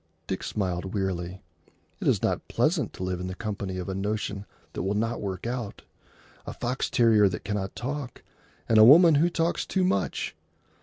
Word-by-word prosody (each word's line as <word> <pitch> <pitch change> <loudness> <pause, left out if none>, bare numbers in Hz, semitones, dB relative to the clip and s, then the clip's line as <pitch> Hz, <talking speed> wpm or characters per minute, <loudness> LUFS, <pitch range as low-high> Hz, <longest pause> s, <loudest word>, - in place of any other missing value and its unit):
Dick 95 - -3
smiled 95 -1 -3
wearily. 95 -2 -3 0.6
It - - -3
is - - +2
not - - -1
pleasant - - +1
to - - -6
live 90 -1 -2
in 90 - -4
the 95 - -5
company 100 -3 -4
of 90 - -5
a 95 - -3
notion 100 0 -3 0.3
that - - -3
will 100 +2 -1
not 115 +3 -1
work 95 -1 -4
out, 120 -3 -4 0.6
a - - -4
fox 125 +2 -2
terrier 110 -4 +4
that 90 +1 -6
cannot 100 -1 -3
talk, 135 0 -5 0.4
and 110 -1 +5
a - - +10
woman 160 +8 +8
who 175 - +4
talks 165 0 0
too 190 - 0
much. 100 - -1
105 Hz, 185 wpm, -27 LUFS, 95-120 Hz, 0.6 s, a